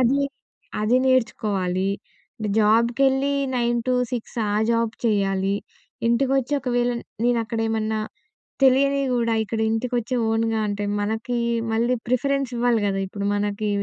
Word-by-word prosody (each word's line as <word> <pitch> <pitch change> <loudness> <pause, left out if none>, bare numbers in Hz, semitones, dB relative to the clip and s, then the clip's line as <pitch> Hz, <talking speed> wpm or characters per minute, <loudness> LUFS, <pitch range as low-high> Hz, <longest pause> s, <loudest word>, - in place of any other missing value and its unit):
అది 260 +3 +3 0.6
అది 215 +4 +3
నేర్చుకోవాలి. 195 -7 +1 0.7
జాబ్‌కెళ్ళి 245 +6 +3 0.2
9-6 240 0 -1
ఆ - - 0 0.2
జాబ్ 230 -1 +1
చేయాలి. 195 -2 +1 0.5
ఇంటికొచ్చి, 265 +3 +1
ఒకవేళ 245 -2 0 0.3
నేనక్కడ 230 -2 0
ఏమన్నా 220 0 -1 0.7
తెలియనివి 275 +1 +4
గూడా 230 -2 +1
ఇక్కడ 220 +1 -4
ఇంటికొచ్చి 240 +2 -1
ఓన్‍గా 225 0 +1
అంటే, 205 0 -2 0.2
మనకి 225 +4 -2 0.4
మళ్ళీ 235 +3 +2
ప్రిఫరెన్స్ 275 +1 0
ఇవ్వాలి 235 -2 +2
గదా! 195 -1 -1
ఇప్పుడు 200 +1 -4
మనకి 205 +1 -1
235 Hz, 110 wpm, -23 LUFS, 215-250 Hz, 0.7 s, తెలియనివి